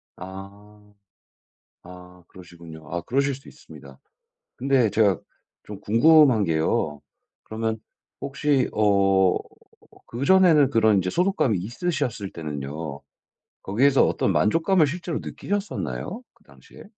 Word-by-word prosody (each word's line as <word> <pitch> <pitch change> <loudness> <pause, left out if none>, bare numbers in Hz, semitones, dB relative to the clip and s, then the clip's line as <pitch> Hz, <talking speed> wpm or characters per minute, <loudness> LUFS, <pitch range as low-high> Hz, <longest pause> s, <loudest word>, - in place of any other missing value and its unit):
아. 100 +2 -12 0.9
아 90 0 -14
그러시군요. 85 -3 -13
아 85 - -2
그러실 140 - 0
수 135 +1 -12
있습니다. - - -15 0.6
근데 130 -5 +2
제가 100 -3 +2 0.4
좀 105 -2 -10
궁금한 125 -1 +4
게요. 80 -2 -1 0.4
그러면 110 0 -3 0.4
혹시 135 -1 0
어 95 -3 +3 0.7
그전에는 150 +2 +4
그런 110 -5 +3
이제 90 0 -2
소속감이 175 - +1
있으셨을 120 - -3
때는요. 75 -1 -6 0.6
거기에서 130 +8 +3
어떤 - - 0
만족감을 165 - +2
실제로 170 +1 -4
느끼셨었나요? 205 +2 -5
그 - - -30
당시에? - - -17
110 Hz, 260 characters per minute, -23 LUFS, 90-140 Hz, 0.9 s, 궁금한